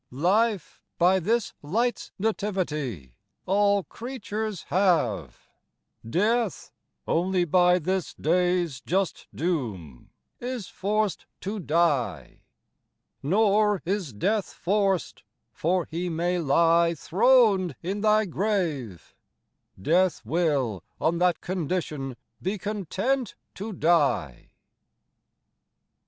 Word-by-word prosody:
25 135 +5 -8
Life, 210 -2 +1 0.2
by 185 +2 +4
this 225 +6 0
light's 230 +11 -1
Nativity 155 - -2 0.3
All 200 +1 +3
creatures 220 - -5
have, 150 - +1 0.6
Death 215 - 0 0.4
onely 180 +1 +1
by 180 +2 +4
this 185 +1 -2
Dayes 175 -3 +1
just 190 +1 -1
doome 110 - -3 0.3
is 245 -4 -4
forc't 205 0 -1 0.2
to 205 +3 -4
Dye. 160 -6 0 0.8
Nor 205 +4 +2
is 185 -5 -2
Death 200 - -1
forc't; 195 -1 +1 0.3
for 175 +1 0
may 175 +1 -1
he 180 - 0
ly 170 +2 +3
Thron'd 200 - +3
in 195 +4 -3
Thy 215 0 +4
Grave, 165 - -2 0.6
Death 170 - +2
will 135 - 0 0.2
on 170 +1 +1
that 180 -2 +2
condition 155 -7 -3 0.2
be 190 +4 -2
content 210 - -2 0.2
to 210 +3 -6
dye. 150 - +1
180 Hz, 95 wpm, -26 LUFS, 160-205 Hz, 0.8 s, by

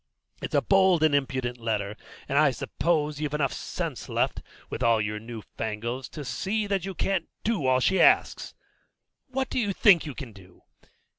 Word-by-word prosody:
It's - - -4
a - - +3
bold 190 -4 +4
and 155 -2 +4
impudent 130 -3 -1
letter, 105 -3 -2 0.3
and 140 - -2
I 155 -2 +5
suppose 150 +4 -1
you've 150 -1 -2
enough 140 -3 0
sense - - -5
left, - - 0 0.3
with - - -6
all 115 -2 +4
your 105 0 -2
new 115 -1 -8
fangles, 120 +4 -3
to 150 -3 -8
see 210 - -1
that 195 -3 -1
you 195 -1 -5
can't 190 -3 -1
do 205 - 0
all 130 0 +4
she 190 +9 +2
asks. - - +3 0.7
What 265 0 -3
do - - 0
you 205 -4 0
think 185 -6 +5
you 145 - -6
can 130 -6 -8
do? 95 -2 -17
145 Hz, 180 wpm, -27 LUFS, 115-190 Hz, 0.7 s, I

